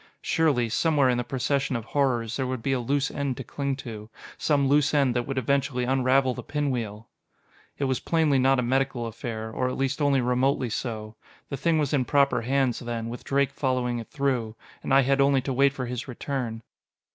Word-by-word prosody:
Surely, 145 -8 +2
somewhere 140 +3 +2
in 125 -1 +1
the - - -1
procession 135 +2 -1
of 115 -2 -3
horrors, 125 -5 0
there 130 -2 -1
would 130 -3 -4
be 135 - 0
a 130 - 0
loose 140 +4 0
end 140 -3 -2
to 135 - -5
cling 140 +2 -3
to. 110 -5 -8 0.3
Some 140 -3 +1
loose 145 +1 +3
end 135 -4 +3
that 120 -1 -1
would 135 -1 -3
eventually 130 0 0
unravel 130 +1 +2
the - - -6
pinwheel! 120 -7 -3 0.7
It - - -3
was 130 -2 0
plainly 155 -5 +2
not 135 +1 +4
a 125 - +1
medical 130 -1 0
affair, 110 0 -5
or 125 +3 -1
at - - -4
least 135 +2 -1
only 140 -2 +3
remotely 125 0 +1
so. 110 -2 -4 0.4
The 140 - -3
thing 160 +4 +1
was 150 -2 0
in 135 -3 +2
proper 140 -3 +3
hands, 130 0 +1
then, 115 -1 -4
with 120 - -7
Drake 140 0 +1
following 125 -3 -1
it 115 - -8
through. 130 -6 -1 0.3
And - - -5
I 135 +1 +7
had 135 +1 +2
only 140 -1 +4
to 135 +1 -3
wait 140 +2 +4
for 130 -2 -4
his 125 +2 -5
return. 125 -3 -4
130 Hz, 205 wpm, -26 LUFS, 120-140 Hz, 0.7 s, I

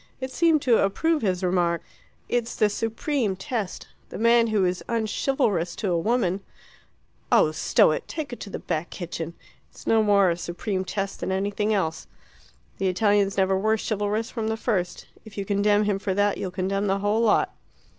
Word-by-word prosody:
It 260 0 -5
seemed 325 0 +3
to 240 -3 +4
approve 310 +11 +1
his 185 -3 0
remark. 175 -2 +1 0.4
"It's 240 -1 -1
the 215 - +3
supreme 225 +1 -1
test. 200 +1 -4 0.2
The - - -7
man 230 +1 +4
who 210 -4 +2
is 180 0 -1
unchivalrous 220 - 0
to 195 - -2
a 170 - +2
woman 200 -2 +1 0.5
" - - -39
"Oh, - - +5
stow - - +3
it! - - -3
Take 300 -5 -5
it - - -7
to 205 - -7
the - - -4
Back 165 0 -3
Kitchen. 170 -2 -6 0.3
It's - - -15
no 225 -1 +4
more 200 -3 +4
a 170 - -2
supreme 185 +2 -3
test 195 +1 -3
than - - -3
anything 205 +2 0
else. 185 -6 -1 0.7
The 195 - +1
Italians 200 +1 +2
never 190 0 +3
were 215 +3 +2
chivalrous 215 +1 -2
from 225 -3 -3
the 220 0 -1
first. 190 -7 -2 0.2
If 220 -2 -14
you 200 - -2
condemn 205 +1 +2
him 205 -2 0
for 195 -1 -2
that, 205 0 +1
you'll 185 - -3
condemn 195 +2 -1
the 195 0 +1
whole 205 +3 +1
lot." 225 -3 +2
205 Hz, 185 wpm, -25 LUFS, 190-225 Hz, 0.7 s, Oh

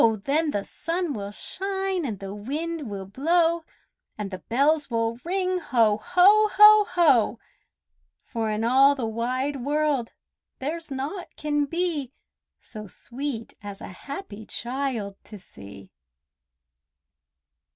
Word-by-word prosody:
Then 305 +4 +1
the 205 -8 -1
sun 335 - -3
will 200 -3 -5
shine 385 - -3
and 215 -4 -4
the 195 0 -7
wind 295 +6 -4
will 195 -2 -5
blow, 330 - +1 0.5
And 205 -2 -5
the 185 - -5
bells 285 +8 +1
will 230 0 -1
ring, 370 +1 0
"Ho! 230 -9 +2
ho! 400 - +5
ho! 420 0 +8
ho!" 270 - +3 0.9
For 225 -1 -2
in 215 +1 -1
all 270 +4 +5
the 255 -4 -3
wide 255 +5 -2
world 290 -4 0 0.4
there's 320 +5 -3
naught 285 +7 -4
can 295 -1 0
be 320 -5 -2 0.5
So 215 -2 -9
sweet 245 +3 -6
as 200 -1 -8
a - - -8
happy 220 - -8
child 240 -6 -3
to 210 - -10
see! 100 - -13
275 Hz, 125 wpm, -25 LUFS, 220-330 Hz, 0.9 s, ho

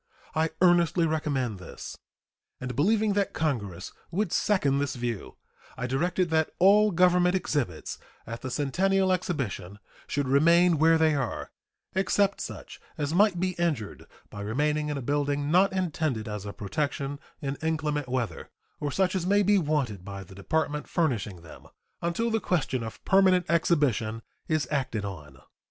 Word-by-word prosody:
I 160 +1 +1
earnestly 175 -1 +4
recommend 140 - -1
this; 90 - -9 0.6
and 125 -1 -5
believing 210 - +2
that 200 -1 0
Congress 105 - -2 0.2
would 205 +4 -1
second 145 -10 +2
this 140 -2 -1
view, 120 -4 -4 0.4
I 125 - -3
directed 170 +7 0
that 160 -1 +2
all 205 +3 +6
Government 180 0 +4
exhibits 140 - -2 0.3
at 115 +1 -7
the 130 - -4
Centennial 185 +8 +1
Exhibition 125 - -3 0.3
should 145 -2 -1
remain 170 +4 +4
where 165 +1 +5
they 160 -1 +3
are, 135 -5 -3 0.4
except 195 +1 +1
such - - -8 0.2
as 145 0 -2
might 195 -1 +4
be 185 +1 +1
injured 150 -12 -2 0.2
by 105 - -7
remaining 150 +8 0
in 145 - -2
a 135 - -5
building 145 +1 0
not 185 +3 +5
intended 155 - -1
as 105 -1 -5
a - - -4
protection 140 +6 -3 0.2
in 140 -2 -3
inclement 150 -3 -1
weather, 120 -9 -3 0.3
or 145 - -2
such 185 +2 +1
as 180 -1 -1
may 205 +1 +4
be 205 +1 +4
wanted 140 - -1
by 100 0 -7
the 95 - -14
Department 150 +9 -2
furnishing 105 - -1
them, 80 - -13 0.3
until 170 +8 0
the 225 - +2
question 150 - -1
of 110 -1 -8
permanent 190 -2 +4
exhibition 135 -10 +1 0.2
is 155 -2 0
acted 130 -8 -1
on. 75 -9 -8
150 Hz, 155 wpm, -27 LUFS, 125-180 Hz, 0.6 s, all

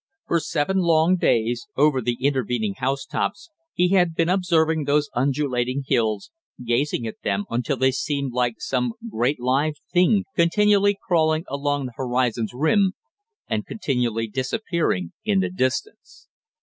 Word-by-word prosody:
For 170 - +2
seven 155 +4 -1
long 170 0 +3
days, 120 - +1
over 145 -2 +3
the 120 0 -1
intervening 125 -6 0
housetops, 135 - -2 0.2
he 180 0 +2
had 180 -3 +3
been 165 +1 +1
observing 165 -4 +2
those 145 +1 +1
undulating 130 0 0
hills, 110 -5 0 0.3
gazing 120 +1 0
at 110 - -7
them 100 0 -1
until 125 +4 -1
they 130 +1 +3
seemed 140 -1 -2
like 120 -2 0
some 125 -3 -1 0.2
great 125 - 0
live 135 +5 +1 0.2
thing 190 +3 +4
continually 205 +3 +3
crawling 160 -2 +2
along 145 0 -1
the 125 - -7
horizon's 120 -3 0
rim, 185 - +2 0.5
and 110 -1 -2
continually 120 - -1
disappearing 130 - -1
in 205 -2 +2
the 190 - 0
distance. 185 - -3
140 Hz, 135 wpm, -23 LUFS, 125-170 Hz, 0.5 s, thing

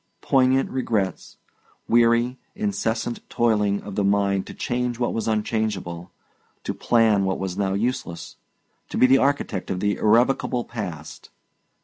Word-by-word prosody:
Poignant 130 0 +3
regrets, 110 -7 -2 0.5
weary, 120 +2 +3 0.2
incessant 120 - -2
toiling 105 -4 +1
of 100 - -7
the 100 - 0
mind 100 -1 +1
to - - -8
change 125 -1 -2
what 120 0 -1
was 115 - -2
unchangeable, 105 -6 -2 0.5
to - - -3
plan 110 -4 +3
what 95 0 0
was 95 -2 -4
now 95 -1 0
useless, 85 -7 -3 0.5
to - - -4
be - - +6
the 135 +1 +5
architect 135 -9 -1
of 90 - -2
the 105 +1 0
irrevocable 120 +2 +2
past. 90 -10 -7
110 Hz, 135 wpm, -23 LUFS, 100-120 Hz, 0.5 s, be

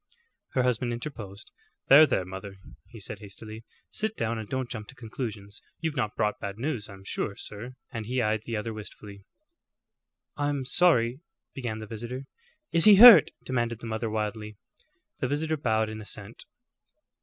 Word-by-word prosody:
Her 130 - +2
husband 125 -1 0
interposed. 115 -5 -7 0.4
"There, 150 +3 +9
there, 95 -8 0
mother," 95 +2 -8 0.3
he 115 - -12
said, 100 +1 -7
hastily. 110 +2 -9 0.3
"Sit 220 0 -2
down, 115 0 -1
and 110 - -7
don't 130 -1 -2
jump 110 -3 -7
to 140 - -11
conclusions. 110 -4 -6 0.2
You've 160 -3 -2
not 110 -6 -1
brought 105 0 0
bad 100 0 -5
news, 120 -4 -3
I'm 95 -1 -12
sure, 100 +1 -3
sir;" 115 +6 -8 0.2
and 115 -4 -5
he 125 +2 -1
eyed 110 -2 +1
the 115 - -2
other 110 +1 -3
wistfully. 105 -1 -10 1.1
"I'm 145 -2 -1
sorry 125 -5 +3 0.2
" - - -61
began 120 -5 -4
the 110 - -7
visitor. 120 +5 -6 0.5
"Is 165 - +4
he 210 -1 +10
hurt?" 235 +2 +11
demanded 120 -3 -1
the 120 - -9
mother, 110 0 -2
wildly. 105 -1 -4 0.6
The - - 0
visitor 155 +3 -1
bowed 110 -7 +1
in 110 0 -7
assent. 105 +1 -6
115 Hz, 165 wpm, -27 LUFS, 105-130 Hz, 1.1 s, hurt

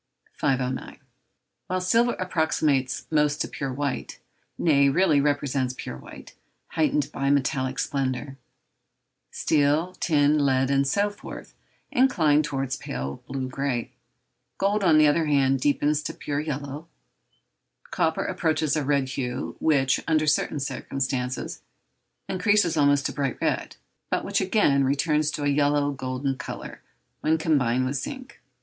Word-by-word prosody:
509. 130 -1 -2 0.7
While 185 0 -1
silver 230 +7 +2
approximates 155 -7 0
most 150 -1 +2
to - - 0
pure 140 -2 -4
white, 140 +1 -3 0.4
nay, 140 -4 +4
really 155 -1 +3
represents 140 -3 0
pure - - -6
white, - - -12 0.4
heightened 300 -1 0
by 140 0 -1
metallic 135 -2 0
splendour, 135 0 -2 0.9
steel, 150 +4 +1
tin, 150 -2 +3
lead, 135 -1 +2
and 140 0 +2
so 200 +8 +1
forth, 205 - -10 0.4
incline 160 - +3
towards 135 -4 -2
pale 65 +2 -5
blue 130 -1 -3
grey; 130 -2 -2 0.7
gold, 200 +1 +1
on 165 -4 +5
the 155 - +6
other 155 +2 +3
hand, 135 -2 +3
deepens 145 +2 +1
to - - -5
pure 145 -1 -3
yellow, 145 +1 -5 1.0
copper - - 0
approaches 155 -2 0
a 155 - 0
red 140 -1 +1
hue, 125 -2 -4
which, 135 -4 +2
under 155 -1 +2
certain 150 0 +1
circumstances, 130 -2 -3 0.7
increases 185 -2 +2
almost 145 -1 +3
to - - 0
bright 140 -3 -2
red, - - -1 0.3
but - - -1
which 200 0 0
again 185 -8 +3
returns 150 +3 +1
to 150 - -4
a - - +1
yellow 145 0 +2
golden 135 0 -3
colour - - -7 0.4
when 160 +1 +2
combined 130 -6 +1
with 135 +2 -1
zinc. 260 - -7
145 Hz, 135 wpm, -25 LUFS, 135-160 Hz, 1.0 s, the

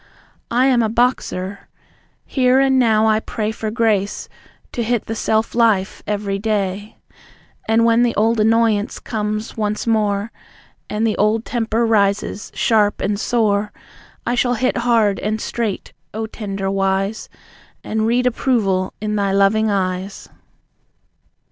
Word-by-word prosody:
"I 245 +2 +2
am 255 -3 +3
a 220 - +1
boxer!" 215 -5 -1 0.6
Here 255 -1 +2
and 265 -1 +3
now 220 -3 +3
I 215 -1 +3
pray 220 -1 -3
For 220 0 -4
grace 215 -3 0 0.4
to 240 - -3
hit 235 -1 -1
the 225 - -4
self 220 0 0
life 220 -5 +1
every 200 -1 -2
day. 205 -1 -2 0.7
And 225 +1 +3
when 230 0 +4
the 240 -1 +1
old 225 +2 +2
annoyance 220 -1 +2
comes 215 0 -4
once 210 -1 -2
more 210 -1 0 0.6
And 215 +2 -1
the 220 - +1
old 215 +2 +1
temper 230 -1 0
rises 205 -2 0
sharp 210 -3 +2
and 200 0 -1
sore, 210 -3 +1 0.5
I 240 - 0
shall 245 0 +1
hit 255 +2 0
hard 230 -4 +2
and 215 +1 -2
straight, 225 -3 -3 0.2
O 220 0 -2
Tender 195 -3 -4
Wise, 195 +2 -1 0.5
And 220 0 -1
read 245 +2 +1
approval 215 -7 0
in 210 0 -2
Thy 200 -1 0
loving 200 +3 +3
eyes. 190 -1 -3
215 Hz, 140 wpm, -19 LUFS, 205-230 Hz, 0.7 s, when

